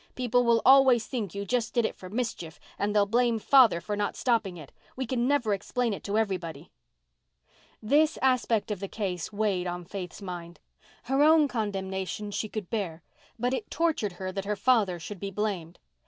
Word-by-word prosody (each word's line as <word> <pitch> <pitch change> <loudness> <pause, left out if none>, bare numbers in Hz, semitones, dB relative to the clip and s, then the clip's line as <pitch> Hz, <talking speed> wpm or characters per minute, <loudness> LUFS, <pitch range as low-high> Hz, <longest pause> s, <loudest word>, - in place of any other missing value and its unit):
People 245 -1 +2
will 235 -1 +3
always 260 -3 +6
think 210 -7 -4
you 200 0 -3
just 240 +2 -1
did 235 -2 +3
it - - -2
for 185 - -10
mischief, 210 -7 -4 0.2
and 205 +1 -1
they'll 205 -1 +5
blame 235 +2 +2
father 235 -5 +5
for 205 +4 -4
not 205 0 -2
stopping 220 -7 0
it. 155 -4 -11 0.2
We 260 - -3
can 245 0 0
never 260 -7 +2
explain 235 +3 -1
it - - -7
to 205 +1 -1
everybody." 180 -7 -3 1.1
This 300 +7 +3
aspect 240 -5 +1
of 205 - -3
the 195 - -4
case 185 -5 -4
weighed 200 -4 0
on 175 0 -5
Faith's 180 -1 -7
mind. 175 -3 -8 0.4
Her 270 +3 +1
own 310 0 +6
condemnation 195 -3 -3
she 215 +1 -3
could 210 -5 -6
bear, 180 -7 -3 0.3
but 245 +2 0
it 345 - -3
tortured 315 - 0
her 185 +1 -5
that 195 +1 -4
her 210 +1 -1
father 200 -5 +2
should 195 +4 -8
be 200 - -4
blamed. 195 -5 -3
210 Hz, 185 wpm, -28 LUFS, 190-245 Hz, 1.1 s, always